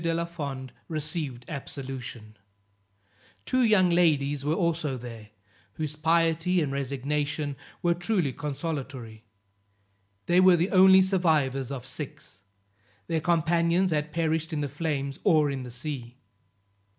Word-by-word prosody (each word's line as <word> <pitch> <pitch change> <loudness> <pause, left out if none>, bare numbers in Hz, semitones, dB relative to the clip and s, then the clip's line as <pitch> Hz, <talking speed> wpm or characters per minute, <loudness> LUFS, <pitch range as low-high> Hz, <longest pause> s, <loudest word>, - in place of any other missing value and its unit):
de 165 0 +1
la 170 0 -1
Fond 140 -6 -6
received 155 -5 -3
absolution; 130 -6 -7 1.1
two 255 0 +2
young 210 -6 +4
ladies 145 -5 +2
were 150 +2 +1
also 165 -6 0
there, 115 -3 -9 0.4
whose 155 +1 -4
piety 165 +2 +2
and 150 -4 0
resignation 140 +2 -2 0.3
were 175 -1 +4
truly 175 - 0
consolatory; 135 -7 -5 1.0
they 175 +1 +4
were 185 -1 +7
the 175 +4 0
only 190 0 +7
survivors 155 -9 +1
of 130 -2 -5
six, 135 - -7 0.6
their 165 -2 -1
companions 170 +2 +2
had 150 0 -1
perished 160 0 -1
in 155 -2 -2
the 145 - -1
flames 140 -2 -3
or 155 -7 +4
in 135 -1 -4
the 125 - -7
sea. 125 -1 -6
150 Hz, 125 wpm, -27 LUFS, 135-170 Hz, 1.1 s, were